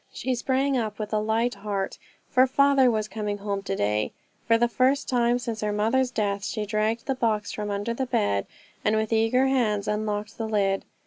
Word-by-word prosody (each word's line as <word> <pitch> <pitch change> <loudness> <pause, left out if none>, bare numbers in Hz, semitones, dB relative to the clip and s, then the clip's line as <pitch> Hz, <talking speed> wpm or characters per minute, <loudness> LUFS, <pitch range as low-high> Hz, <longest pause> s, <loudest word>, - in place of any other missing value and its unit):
She 260 - -2
sprang 265 +3 0
up 220 -4 -2
with 215 0 -5
a 215 - +3
light 225 +3 +1
heart, 200 -1 -4 0.3
for 255 0 +4
father 275 -1 +4
was 215 -2 0
coming 210 -1 -3
home 200 -1 -3
to 195 0 -3
day. 105 - 0 0.3
For 230 -1 +5
the 240 +1 +3
first 260 +3 +1
time 240 -1 +2
since 230 -3 -4
her 210 -1 0
mother's 225 +5 +1
death 200 -4 -1
she 210 0 -3
dragged 215 +2 -1
the 270 - 0
box 220 -5 0
from 210 -1 -4
under 205 +3 -2
the 260 +2 -2
bed, 100 - 0 0.4
and 215 - +2
with 220 +1 0
eager 225 +4 +3
hands 220 -6 +1
unlocked 210 0 -2
the 225 - -2
lid. 195 -2 +1
220 Hz, 200 wpm, -26 LUFS, 210-245 Hz, 0.4 s, For